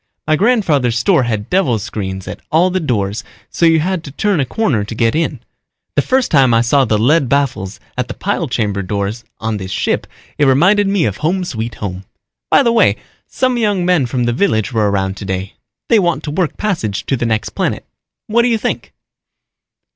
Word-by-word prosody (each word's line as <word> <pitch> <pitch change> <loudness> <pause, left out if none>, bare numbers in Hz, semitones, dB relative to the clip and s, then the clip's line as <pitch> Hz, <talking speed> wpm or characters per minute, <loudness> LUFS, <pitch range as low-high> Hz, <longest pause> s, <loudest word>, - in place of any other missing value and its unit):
My 155 - +3
grandfather's 155 - +2
store 165 +6 +3
had 110 -3 -2
devil 180 -11 +2
screens 95 -3 -5
at - - -7
all 175 +4 +3
the 185 - 0
doors 110 - -1 0.3
so 170 - +2
you 165 -1 +4
had 180 0 -1
to 140 - -9
turn 200 +4 0
a 135 - 0
corner 150 - 0
to 110 +2 -7
get 115 0 +2
in. 165 +2 -1 0.5
The - - +2
first 260 -1 +1
time 135 -6 +5
I 115 - +4
saw 135 +3 +3
the 110 -2 +1
lead 130 +4 +3
baffles 125 -9 -1 0.2
at 125 -1 -2
the 125 - -6
pile 190 -4 -2
chamber 105 -6 -1
doors 100 +4 -3 0.2
on 110 -1 -2
this 95 -2 -6
ship 100 - -1 0.3
it 145 - +4
reminded 185 +10 +4
me 195 -3 +1
of 105 -2 -2
home 180 +5 0
sweet 115 -9 -4
home. 95 -2 -5 0.5
By 275 - +5
the 235 - +3
way, 210 - +4 0.3
some 255 -1 0
young 205 -5 +1
men 175 -8 +2
from 125 0 -1
the 120 0 +1
village 120 - 0
were 110 -2 +2
around 95 -1 -1
today. 95 -1 -4 0.3
They 230 - +4
want 175 -3 0
to 150 - -4
work 165 +1 -1
passage 115 - -2
to 135 - 0
the 120 -2 -1
next 110 -1 -1
planet. - - -2 0.4
What 235 +2 +2
do 240 - +2
you 230 -2 +2
think?" - - -3
130 Hz, 205 wpm, -16 LUFS, 110-180 Hz, 0.5 s, time